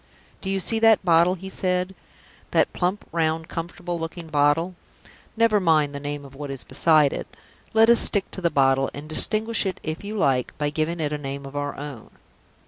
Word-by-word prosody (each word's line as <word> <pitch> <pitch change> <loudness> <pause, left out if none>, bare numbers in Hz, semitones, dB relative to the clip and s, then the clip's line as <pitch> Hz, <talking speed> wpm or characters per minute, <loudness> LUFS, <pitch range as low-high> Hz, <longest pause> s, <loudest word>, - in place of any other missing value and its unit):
"Do 190 - -4
you 195 0 0
see 225 +4 +2
that 220 -3 +4
bottle," 170 +1 +4
he 190 +1 -9
said 185 0 -1 0.6
"that - - +2
plump, 185 +3 -1
round, 160 -1 0
comfortable 175 +1 -5
looking 165 0 -6
bottle? 150 +4 +2 0.6
Never 225 -2 +4
mind 155 -5 +2
the 140 - -5
name 145 0 -5
of 135 - -13
what 145 +1 -7
is 135 -2 -6
beside 155 -4 +3
it; - - -5 0.5
let 225 0 +6
us 235 0 +6
stick 200 -3 +3
to 190 - -8
the 170 - +2
bottle, 135 -2 +2
and 145 +2 -8
distinguish 215 +8 +1
it, 185 -2 -3
if 155 +3 -5
you 210 +2 -5
like, 130 -9 0
by 150 -1 -1
giving 160 +3 -2
it 150 -1 -1
a 150 - -3
name 140 0 -6
of 135 +1 -10
our 145 0 -3
own. 140 -6 -8
165 Hz, 200 wpm, -24 LUFS, 145-185 Hz, 0.6 s, let